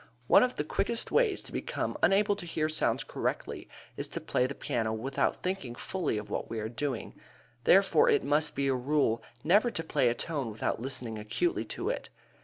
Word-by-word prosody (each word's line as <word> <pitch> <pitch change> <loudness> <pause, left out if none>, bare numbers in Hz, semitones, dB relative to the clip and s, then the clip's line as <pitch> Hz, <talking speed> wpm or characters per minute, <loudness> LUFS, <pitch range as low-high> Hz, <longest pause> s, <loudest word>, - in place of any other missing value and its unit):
One - - +7
of 250 0 +1
the - - -1
quickest 225 +9 -2
ways 455 -6 +3
to - - -8
become - - -3
unable 200 +1 +4
to 175 - -8
hear 155 -2 0
sounds 155 - +1
correctly - - -3 0.3
is - - -1
to - - -5
play 125 - +1
the 140 - -6
piano 110 -2 -1
without 130 +5 -1
thinking 180 -10 -3
fully 170 - -2
of 105 0 -5
what - - -3
we 115 - -3
are 110 - -2
doing. 120 +1 -3 0.5
Therefore 200 - +5
it 430 -3 +3
must 150 +1 +1
be 140 0 0
a 135 - +3
rule 130 -2 +1 0.2
never 205 +9 +4
to 185 -8 -4
play 125 -6 +2
a 120 - 0
tone 140 -4 -3
without 110 +1 -2
listening 125 -4 -2
acutely 340 - -1
to - - -2
it. - - -5
145 Hz, 200 wpm, -30 LUFS, 120-195 Hz, 0.5 s, One